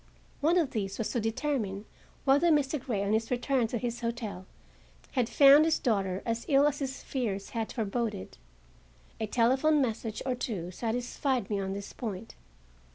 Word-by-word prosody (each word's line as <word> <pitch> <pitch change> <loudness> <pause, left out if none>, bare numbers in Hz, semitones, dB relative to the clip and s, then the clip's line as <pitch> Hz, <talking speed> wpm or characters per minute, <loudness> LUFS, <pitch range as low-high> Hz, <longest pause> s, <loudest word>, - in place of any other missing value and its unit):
One 325 +5 +3
of 320 -7 +2
these 195 -3 -3
was 225 - -2
to 240 - 0
determine 225 -3 -2 0.4
whether 285 +5 +4
Mr. 295 -3 +2
Grey, 210 -6 -1
on 200 +1 0
his 225 +1 0
return 250 0 +1
to 240 - -2
his 240 0 -3
hotel, 230 -6 -4 0.6
had 250 -3 0
found 280 +4 +8
his 320 0 +2
daughter 195 -6 0
as 230 0 -1
ill 280 0 +5
as 290 -1 +1
his 270 -1 -4
fears 210 -7 -3
had 225 -2 -3
foreboded. 220 - -3 0.8
A 220 - -2
telephone 260 +7 +3
message 225 -4 -2
or 260 - +1
two 205 -8 -4
satisfied 245 +2 -2
me 205 - 0
on 190 0 -2
this 200 0 -7
point. 220 -3 -6
235 Hz, 165 wpm, -29 LUFS, 210-270 Hz, 0.8 s, found